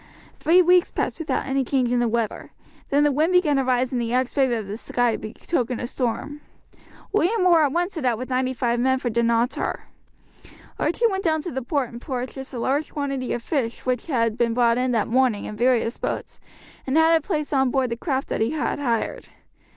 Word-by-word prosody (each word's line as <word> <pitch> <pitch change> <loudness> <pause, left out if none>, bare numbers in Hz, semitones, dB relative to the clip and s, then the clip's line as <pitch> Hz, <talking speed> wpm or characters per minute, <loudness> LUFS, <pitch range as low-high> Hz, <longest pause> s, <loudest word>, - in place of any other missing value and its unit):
Three 350 +4 +5
weeks 360 +1 +4
passed - - -3
without 325 - -2
any 270 0 0
change 255 -2 0
in 245 - +2
the 240 - +2
weather; 230 -1 -2 0.4
then 285 +1 +3
the 295 - +3
wind 310 +6 +1
began 325 -6 +3
to 270 - +2
rise 255 0 +1
and 250 -2 -1
the 230 0 -2
aspect 260 +1 +1
of 225 -3 -1
the 200 +2 -5
sky 240 0 0
betokened 245 +2 -3
a - - -3
storm. 265 +4 -3 0.7
William 410 0 +2
Orr 335 -4 +5
at - - -5
once 350 +5 -1
set 315 -7 -4
out 240 -3 +2
with 255 +3 -6
ninety 255 0 +1
five 240 -1 -1
men 260 +2 +2
for 250 -2 -3
Dunottar. 235 +2 0 1.0
Archie 475 - +1
went 385 -3 -2
down 315 -3 +1
to 350 - -5
the 265 - -3
port 260 0 -1
and 235 0 -10
purchased 260 0 -5
a 255 - -6
large 275 +6 -1
quantity 275 -3 -3
of 240 - -3
fish 240 -6 -2
which 255 +2 -1
had 230 -6 0
been 230 -1 +1
brought 240 -1 +3
in 255 0 +1
that 225 -3 +1
morning 245 -3 +1
in 210 - -6
various 240 0 +1
boats, - - -4 0.5
and 265 +4 +1
had 320 +1 +5
it 325 - +2
placed 300 -3 -3
on 265 -2 +3
board 255 -1 0
the - - 0
craft 265 +2 -2
that - - -2
he 225 - +2
had 305 -1 -2
hired. 235 -5 -2
260 Hz, 215 wpm, -23 LUFS, 240-295 Hz, 1.0 s, Three